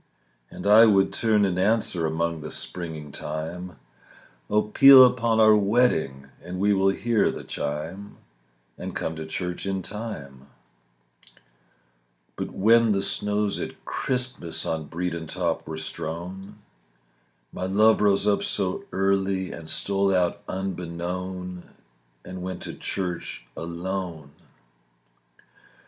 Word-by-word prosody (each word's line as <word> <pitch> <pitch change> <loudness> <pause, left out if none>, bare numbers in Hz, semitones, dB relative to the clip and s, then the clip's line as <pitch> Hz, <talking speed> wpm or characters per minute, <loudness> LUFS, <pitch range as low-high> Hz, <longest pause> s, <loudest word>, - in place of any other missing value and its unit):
And - - -9
I 110 +3 +8
would 100 -2 +3
turn 110 -3 +2
and 90 -2 -1
answer 95 -5 +2
Among 80 0 -2
the - - -6
springing 80 -4 -4
thyme, 80 +5 -6 0.7
"Oh, 105 +1 +3
peal 130 +4 +9
upon 115 -3 +1
our 110 -1 +7
wedding, 100 - +1 0.2
And 90 +1 -6
we 100 +1 +3
will 95 0 +3
hear 115 +3 +1
the - - -6
chime, 80 +8 -5 0.6
And - - -6
come 80 - -3
to 80 0 -7
church 90 +3 -4
in 95 -1 -2
time." 70 - -7 1.9
But - - -4
when 115 +2 +4
the 100 0 0
snows 105 0 0
at - - -7
Christmas 125 -10 -2
On 80 -1 -2
Bredon 85 -1 -4
top - - -2
were 80 0 -5
strown, 85 +5 -5 1.0
My 95 - -3
love 110 +3 +4
rose 100 0 +3
up 105 - +3
so 95 -3 -1
early 95 -1 0
And 80 -1 -9
stole 100 +2 +1
out 90 -1 0
unbeknown 90 0 -4 0.6
And 90 0 -7
went 95 0 -5
to - - -5
church 90 -9 -4
alone. 85 -2 -5
95 Hz, 125 wpm, -25 LUFS, 85-105 Hz, 1.9 s, peal